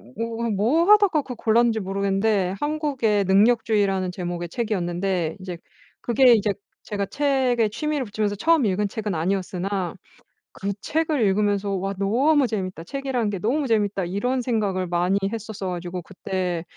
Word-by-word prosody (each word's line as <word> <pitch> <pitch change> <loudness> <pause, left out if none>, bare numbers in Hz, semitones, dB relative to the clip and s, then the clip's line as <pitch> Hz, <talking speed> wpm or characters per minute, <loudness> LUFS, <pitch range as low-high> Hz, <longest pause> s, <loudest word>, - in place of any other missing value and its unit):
뭐 230 0 -3
뭐 230 +12 +2
하다가 405 -7 +5
그 260 -2 -7
골랐는지 225 0 +2
모르겠는데 195 0 0
한국의 285 -9 0
능력주의라는 200 -2 +2
제목의 175 -1 -4
책이었는데 180 -5 -2
이제 185 -2 -6 0.4
그게 245 +1 +5
이제 215 -2 +2 0.3
제가 200 -1 -3
책에 260 -3 +1
취미를 300 +4 -2
붙이면서 205 -1 -2
처음 320 +5 +3
읽은 205 +1 +1
책은 210 -1 -3
아니었으나 185 +2 -2 0.6
그 200 +1 -3
책을 315 -3 0
읽으면서 205 0 +1
'와 195 0 -2
너무 265 +9 +3
재밌다. 185 -6 -4
책이란 265 -2 -2
게 195 - -4
너무 265 +9 0
재밌다.' 205 -4 +1
이런 245 +9 -1
생각을 210 -6 -1
많이 175 +3 +1 0.2
했었어 220 -3 -5
가지고 180 0 -5
그때 185 -2 -3
205 Hz, 345 characters per minute, -23 LUFS, 190-240 Hz, 0.6 s, 하다가